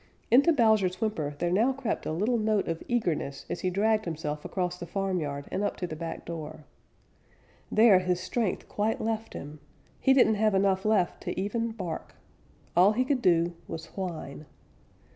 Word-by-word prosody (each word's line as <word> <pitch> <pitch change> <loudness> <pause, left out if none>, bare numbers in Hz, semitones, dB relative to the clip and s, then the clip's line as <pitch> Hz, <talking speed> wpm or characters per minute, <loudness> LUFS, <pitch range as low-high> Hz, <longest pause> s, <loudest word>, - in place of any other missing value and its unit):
Into 275 +8 +6
Bowser's 215 - +3
whimper 160 -10 -2
there 175 +2 -1
now 225 +8 +3
crept 260 -3 -3
a - - -1
little 215 +9 +1
note 215 -2 +1
of 165 -1 -3
eagerness 170 - -1
as - - -3
he 185 - 0
dragged 215 +3 +1
himself 150 -3 -4
across 180 -1 -3
the 175 - -6
farmyard 170 -7 -2
and - - -1
up - - -1
to 180 - -3
the 160 - -6
back 165 +1 -6
door. 155 -2 -7 1.1
There 215 -4 +6
his 180 -1 0
strength 195 +2 -2
quite 215 +2 -1
left 225 0 -3
him. 150 +1 -8 0.4
He 265 - +4
didn't 235 -5 +4
have 215 -2 +3
enough 190 0 +2
left 210 -5 +1
to - - -3
even 230 +4 -1
bark. 185 -8 -6 0.6
All 185 +5 +6
he 255 +3 +1
could 265 -1 0
do 170 -3 +3
was 165 0 -6
whine. 160 -6 -5
190 Hz, 175 wpm, -28 LUFS, 165-220 Hz, 1.1 s, Into